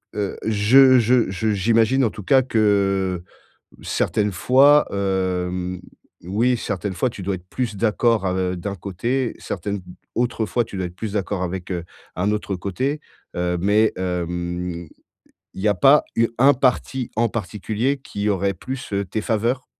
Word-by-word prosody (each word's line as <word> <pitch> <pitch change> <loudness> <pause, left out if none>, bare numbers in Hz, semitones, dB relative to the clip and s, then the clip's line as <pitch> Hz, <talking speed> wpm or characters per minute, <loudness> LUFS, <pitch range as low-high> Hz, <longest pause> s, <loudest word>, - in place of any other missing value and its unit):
heu, 100 -2 -2
je 125 +5 +6
je 120 0 +3
je 110 +3 -1
j'imagine 115 +6 +2
en 115 - +3
tout 105 - -9
cas 130 +8 +4
que 100 -6 +1 0.6
certaines 105 -1 0
fois, 135 +10 +5
hem, 90 -2 -2 0.4
oui, 115 +8 +1
certaines 100 -3 -3
fois 125 +7 0
tu 110 - -10
dois 95 +1 -1
être 90 0 -9
plus 120 -5 -3
d'accord 115 0 +1
av 95 0 0
heu, 90 -1 -1
d'un 100 +3 -4
côté, 115 +8 -2
certaines 100 +2 -4 0.3
autres 120 -2 0
fois 120 +2 0
tu 110 - -9
dois 95 -1 -2
être 90 - -10
plus 110 -1 -5
d'accord 100 -2 -2
avec, 90 0 -4
heu, 85 -2 -3 0.3
un 95 +4 +1
autre 105 -2 -2
côté, 130 +11 -2 0.4
heu, 90 0 0
mais, 105 +4 +3
hem, 90 -1 -3 0.7
il 95 - -7
y - - 0
a 105 - +3
pas 135 +10 +5
u 115 0 +3
un 140 +3 +6
parti 130 0 0
en 115 +1 +2
particulier 110 +5 -2
qui 105 -6 -4
aurait 100 -1 0
plus, 130 +6 -7
heu, 100 0 0
tes 100 +4 -3
faveurs? 115 +4 -1
105 Hz, 165 wpm, -22 LUFS, 95-120 Hz, 0.7 s, je